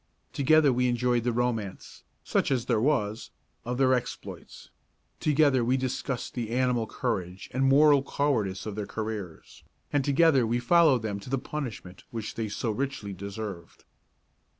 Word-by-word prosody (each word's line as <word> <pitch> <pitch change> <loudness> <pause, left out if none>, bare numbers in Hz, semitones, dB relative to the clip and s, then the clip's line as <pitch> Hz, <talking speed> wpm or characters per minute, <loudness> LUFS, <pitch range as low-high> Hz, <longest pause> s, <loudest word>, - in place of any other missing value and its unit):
Together 145 0 +4
we 125 +1 +1
enjoyed 120 0 +1
the 120 - +1
romance, 115 -5 -3 0.2
such - - 0
as 125 -3 0
there 115 -4 +1
was, 115 -6 0 0.3
of 125 +1 -3
their 130 -1 +4
exploits; 125 -1 -5 0.5
together 145 -4 +3
we 125 +3 +2
discussed 130 -1 -3
the 120 -3 -4
animal 125 -2 +1
courage 90 -1 -3
and 130 +2 +1
moral 145 +1 +6
cowardice 115 -10 -1
of 110 - -4
their 105 0 -4
careers; 105 -6 -6 0.3
and 145 -2 +2
together 140 -3 +4
we 120 +2 +1
followed 135 -1 +4
them 100 -2 -3
to 100 - -11
the 135 - +1
punishment 125 -10 -6
which 115 -2 -5
they 110 -2 -3
so 110 +2 -2
richly 125 -4 -3
deserved. 100 -1 -7
120 Hz, 150 wpm, -27 LUFS, 110-135 Hz, 0.5 s, moral